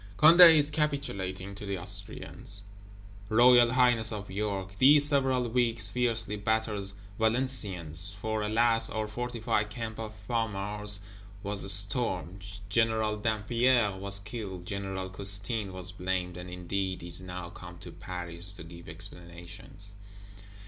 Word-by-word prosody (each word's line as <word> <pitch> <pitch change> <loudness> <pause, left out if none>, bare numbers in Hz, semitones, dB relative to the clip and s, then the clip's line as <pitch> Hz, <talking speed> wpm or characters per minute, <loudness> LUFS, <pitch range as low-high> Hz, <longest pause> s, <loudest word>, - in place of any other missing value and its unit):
Condé 165 +1 +9
is 145 0 +3
capitulating 100 -11 -3
to 100 - -9
the 100 -1 -3
Austrians; 100 +1 -2 0.7
Royal 120 +1 +5
Highness 120 -3 +3
of 105 -3 -7
York, 100 -1 -4
these 145 +2 +6
several 130 -4 +1
weeks, 115 -3 0
fiercely 115 -3 -1
batters 105 -2 -2 0.2
Valenciennes. 100 - -1
For, 110 +1 -2
alas, 115 +1 +2
our 110 -1 -3
fortified 110 -2 -2
Camp 115 0 -6
of 110 -1 -7
Famars 105 -2 -2 0.4
was 100 -1 +2
stormed; 95 -2 +2 0.2
General 110 0 +1
Dampierre 110 +1 +1
was 100 +1 -5
killed; 100 -4 -7
General 95 -1 -4
Custine 100 +2 -2
was 95 0 -5
blamed, 90 -1 -3
and 90 0 -8
indeed 95 +1 -4
is 85 0 -6
now 90 -1 -8
come 90 -1 -11
to 90 - -11
Paris 90 +1 -1
to 90 - -9
give 85 0 -12
"explanations." 90 +4 -6
105 Hz, 125 wpm, -28 LUFS, 95-115 Hz, 0.7 s, Condé